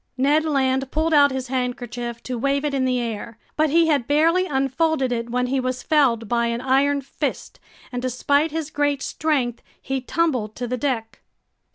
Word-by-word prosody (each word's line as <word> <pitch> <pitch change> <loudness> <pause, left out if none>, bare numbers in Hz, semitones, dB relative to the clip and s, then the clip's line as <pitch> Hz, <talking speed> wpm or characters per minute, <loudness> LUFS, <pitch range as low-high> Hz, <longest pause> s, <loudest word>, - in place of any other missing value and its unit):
Ned 290 +4 +3
Land 265 -3 +1
pulled 315 +1 0
out 285 -1 +6
his 260 -2 -4
handkerchief 245 -2 -3
to 255 - -4
wave 275 +4 0
it 290 - -1
in 265 -1 +1
the 255 -1 +1
air. 230 -1 -5 0.2
But 310 0 +2
he 330 +3 +4
had 285 -7 +1
barely 330 +5 +3
unfolded 270 0 0
it 235 -1 -2
when 250 +1 0
he 265 +2 0
was 255 0 -3
felled 250 -8 +2
by 235 +1 +1
an 235 0 -1
iron 275 +2 +2
fist, 275 - -5 0.3
and 245 -1 -3
despite 285 +5 +1
his 315 -1 -4
great 290 -1 0
strength, 270 -7 -1 0.2
he 270 0 -3
tumbled 255 -7 -1
to 245 - -4
the 250 - -1
deck. 240 -4 -3
265 Hz, 185 wpm, -22 LUFS, 245-290 Hz, 0.3 s, out